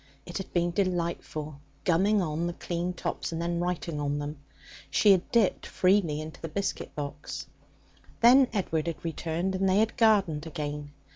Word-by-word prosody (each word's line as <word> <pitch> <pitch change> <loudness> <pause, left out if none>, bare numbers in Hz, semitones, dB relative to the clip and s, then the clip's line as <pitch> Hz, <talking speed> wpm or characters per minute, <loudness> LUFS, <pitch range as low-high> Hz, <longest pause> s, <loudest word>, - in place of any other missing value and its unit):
It 175 +2 -5
had 195 - -7
been 175 0 +1
delightful, 170 -5 -2 0.2
gumming 195 +4 +3
on 160 +1 -1
the 175 - -3
clean 175 +1 -3
tops, 180 - -4
and 165 - -3
then 170 0 -1
writing 175 -3 -2
on 145 0 -1
them. 145 0 -5 0.5
She 205 +8 +5
had 190 -2 +3
dipped 230 -6 +2
freely 180 -5 +2
into 155 0 -8
the 165 - -4
biscuit 200 +5 -3
box. 145 0 -5 0.7
Then 255 +3 +7
Edward 170 -6 -1
had 170 0 -4
returned, 165 +3 -2
and 190 0 +1
they 185 - +3
had 220 +2 +2
gardened 195 -10 +3
again. 150 -2 -5
170 Hz, 165 wpm, -28 LUFS, 155-190 Hz, 0.7 s, Then